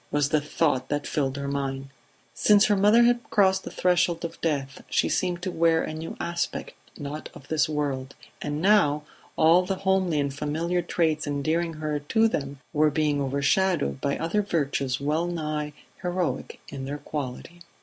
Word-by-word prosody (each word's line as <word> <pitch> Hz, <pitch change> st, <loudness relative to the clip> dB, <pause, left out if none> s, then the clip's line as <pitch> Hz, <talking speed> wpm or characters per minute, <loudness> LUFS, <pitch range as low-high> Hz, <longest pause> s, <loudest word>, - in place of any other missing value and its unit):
was 145 Hz, -1 st, +1 dB
the 155 Hz, -1 st, +2 dB
thought 145 Hz, -3 st, 0 dB
that 145 Hz, 0 st, -1 dB
filled 135 Hz, -2 st, -1 dB
her 140 Hz, 0 st, -3 dB
mind. 135 Hz, -1 st, -3 dB, 0.4 s
Since 210 Hz, -1 st, +5 dB
her 210 Hz, -, +3 dB
mother 210 Hz, +4 st, +5 dB
had 240 Hz, 0 st, +3 dB
crossed 190 Hz, -3 st, +3 dB
the -, -, -6 dB
threshold 175 Hz, -2 st, +1 dB
of 165 Hz, -, -8 dB
death 140 Hz, -4 st, -2 dB
she -, -, +2 dB
seemed 180 Hz, -1 st, -1 dB
to 185 Hz, -, -2 dB
wear 165 Hz, -1 st, +3 dB
a -, -, -4 dB
new 160 Hz, +1 st, -6 dB
aspect, 170 Hz, 0 st, -3 dB, 0.2 s
not 150 Hz, 0 st, -6 dB
of 140 Hz, -, -13 dB
this 160 Hz, 0 st, +2 dB
world; 140 Hz, -3 st, -2 dB, 0.3 s
and 150 Hz, +2 st, -3 dB
now 170 Hz, -8 st, +4 dB, 0.3 s
all 165 Hz, +3 st, +5 dB
the 190 Hz, +1 st, -2 dB
homely 190 Hz, -5 st, +2 dB
and 140 Hz, -1 st, -1 dB
familiar 160 Hz, +5 st, -1 dB
traits 160 Hz, -3 st, 0 dB
endearing 155 Hz, +4 st, 0 dB
her 155 Hz, -1 st, -2 dB
to 220 Hz, +10 st, +2 dB
them 140 Hz, -9 st, -3 dB, 0.2 s
were 155 Hz, 0 st, +4 dB
being 150 Hz, -1 st, +1 dB
overshadowed 140 Hz, -, +1 dB
by 140 Hz, -, 0 dB
other 165 Hz, +6 st, 0 dB
virtues 140 Hz, -8 st, -1 dB
well 155 Hz, +4 st, 0 dB
nigh 155 Hz, -3 st, -3 dB, 0.3 s
heroic 180 Hz, -1 st, -2 dB
in 135 Hz, -1 st, -6 dB
their 145 Hz, +2 st, -4 dB
quality. 150 Hz, +3 st, -6 dB
155 Hz, 170 wpm, -26 LUFS, 145-175 Hz, 0.4 s, Since